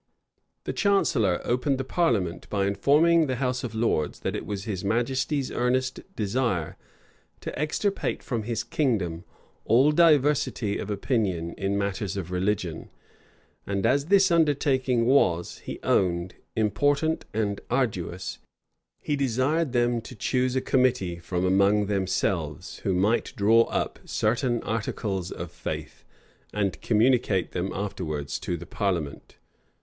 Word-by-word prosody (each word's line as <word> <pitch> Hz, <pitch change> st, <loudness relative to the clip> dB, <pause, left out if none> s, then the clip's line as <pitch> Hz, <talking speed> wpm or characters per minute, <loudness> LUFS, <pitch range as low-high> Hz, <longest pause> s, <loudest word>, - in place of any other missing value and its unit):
The -, -, -3 dB
chancellor 130 Hz, -, +2 dB
opened 125 Hz, +3 st, 0 dB
the 135 Hz, -, -2 dB
parliament 115 Hz, -, 0 dB
by 100 Hz, -2 st, 0 dB
informing 150 Hz, -, +4 dB
the 130 Hz, -, -1 dB
house 125 Hz, 0 st, -1 dB
of 115 Hz, -3 st, -5 dB
lords, 110 Hz, -10 st, 0 dB
that -, -, -2 dB
it -, -, -5 dB
was 100 Hz, -2 st, -4 dB
his 100 Hz, -3 st, -4 dB
majesty's 130 Hz, +6 st, 0 dB
earnest 130 Hz, +1 st, 0 dB, 0.2 s
desire 105 Hz, -6 st, -1 dB, 0.7 s
to -, -, -5 dB
extirpate 195 Hz, +7 st, -1 dB
from 120 Hz, -4 st, -2 dB
his 115 Hz, +1 st, -2 dB
kingdom 95 Hz, -, -1 dB, 0.4 s
all 130 Hz, +7 st, +4 dB
diversity 150 Hz, -9 st, +3 dB
of 105 Hz, -, -5 dB
opinion 100 Hz, -6 st, -1 dB
in 100 Hz, 0 st, -1 dB
matters 100 Hz, -1 st, -2 dB
of 90 Hz, -2 st, -5 dB
religion; 90 Hz, -2 st, -2 dB, 0.8 s
and 100 Hz, 0 st, -1 dB
as 140 Hz, +4 st, +3 dB
this 195 Hz, -1 st, +5 dB
undertaking 135 Hz, -6 st, +2 dB
was, 90 Hz, -10 st, +2 dB
he -, -, -7 dB
owned, 90 Hz, -1 st, +1 dB, 0.2 s
important 145 Hz, +9 st, +1 dB
and 105 Hz, -2 st, -1 dB
arduous, 95 Hz, -8 st, -2 dB, 0.6 s
he 150 Hz, -, 0 dB
desired 140 Hz, +3 st, +1 dB
them 120 Hz, -1 st, +1 dB
to 125 Hz, -, -10 dB
choose 125 Hz, +4 st, 0 dB
a 130 Hz, -, +2 dB
committee 125 Hz, -11 st, +1 dB
from 90 Hz, +1 st, -2 dB
among 100 Hz, +2 st, +3 dB
themselves, 95 Hz, -6 st, -1 dB
who 95 Hz, -, -1 dB
might 105 Hz, +6 st, +1 dB
draw 115 Hz, +1 st, +5 dB
up -, -, -2 dB
certain 120 Hz, +2 st, 0 dB
articles 100 Hz, -4 st, -2 dB
of 85 Hz, -1 st, -6 dB
faith; 85 Hz, -1 st, -6 dB, 0.5 s
and 100 Hz, -3 st, -1 dB
communicate 110 Hz, -5 st, +2 dB
them 90 Hz, +1 st, -2 dB
afterwards 80 Hz, -8 st, -4 dB
to 85 Hz, -, -3 dB
the 85 Hz, -, -9 dB
parliament. 85 Hz, -7 st, -3 dB
110 Hz, 135 wpm, -26 LUFS, 95-130 Hz, 0.8 s, this